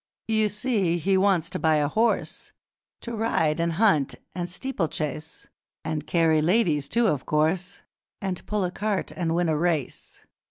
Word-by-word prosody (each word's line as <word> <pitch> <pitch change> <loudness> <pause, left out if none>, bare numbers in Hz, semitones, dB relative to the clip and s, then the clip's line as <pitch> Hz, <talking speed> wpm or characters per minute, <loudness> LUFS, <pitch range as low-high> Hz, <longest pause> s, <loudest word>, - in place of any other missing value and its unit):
'You 220 -1 +2
see, 205 -6 0
he 190 +4 +1
wants 190 -4 +3
to - - -2
buy 160 -1 +3
a 150 -1 +2
horse, 225 +9 -1 0.5
To 235 -1 -5
ride, 165 -8 +1
and 170 0 0
hunt, 170 -7 +2 0.2
and 175 -1 -4
steeplechase, 165 - -3 0.4
And 155 -2 -3
carry 165 -2 +3
ladies, 160 -5 +2
too, 235 0 +2
of 150 -11 0
course, 160 +4 0 0.4
And 190 -2 -4
pull 210 -2 0
a 180 - -1
cart 205 +1 -2
and 165 -3 -1
win 175 0 +1
a 160 - +1
race. 155 -4 -2
175 Hz, 160 wpm, -25 LUFS, 155-205 Hz, 0.5 s, wants